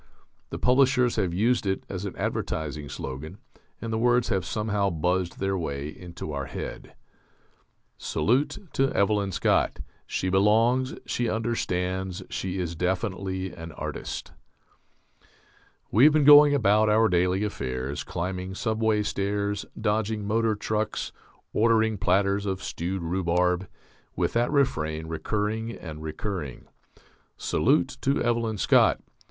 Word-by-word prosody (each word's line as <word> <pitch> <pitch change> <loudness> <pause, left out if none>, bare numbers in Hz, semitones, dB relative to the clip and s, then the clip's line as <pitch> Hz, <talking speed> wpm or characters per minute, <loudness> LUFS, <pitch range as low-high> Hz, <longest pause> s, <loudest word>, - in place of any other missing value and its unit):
The - - -5
publishers 125 -1 +3
have 95 -5 +1
used 110 +5 +1
it 95 0 -1
as 95 0 -5
an 100 - -5
advertising 75 -2 -3
slogan, 70 +7 -6 0.4
and 115 -1 -4
the 110 - 0
words 120 0 +3
have 95 -5 0
somehow 105 -2 0
buzzed 90 +2 -1
their 95 0 -1
way 70 -5 -3
into 85 -1 -8
our 70 -2 -4
head: - - -7 1.0
"Salute 140 - 0
to 135 0 +2
Evelyn 100 -1 +1
Scott: - - +1 0.3
she - - -2
belongs, 115 +7 +3
she 120 -2 -1
understands, 95 -5 -2
she 95 0 -3
is 85 -2 -3
definitely 95 +1 -2
an 80 -1 -9
artist." - - -5 1.6
We 115 +7 +6
have 150 - +7
been 155 -1 +4
going 145 0 +9
about 105 -3 +3
our 110 +1 +5
daily 90 +1 +2
affairs, 65 -7 -3
climbing 90 +2 -4
subway 110 -1 +1
stairs, 100 0 -2
dodging 105 0 0
motor 110 +1 +1
trucks, 110 +1 -2 0.4
ordering 110 -1 +3
platters 100 +1 +2
of 95 -1 -3
stewed 90 +2 -3
rhubarb, 90 +1 +1 0.5
with - - 0
that 120 +1 +2
refrain 80 - 0
recurring 105 +8 -2
and 80 -8 -8
recurring. 80 - -5 0.7
_Salute 85 - +1
to 135 +1 +1
Evelyn 115 -2 0
Scott! - - +4
100 Hz, 125 wpm, -26 LUFS, 90-110 Hz, 1.6 s, going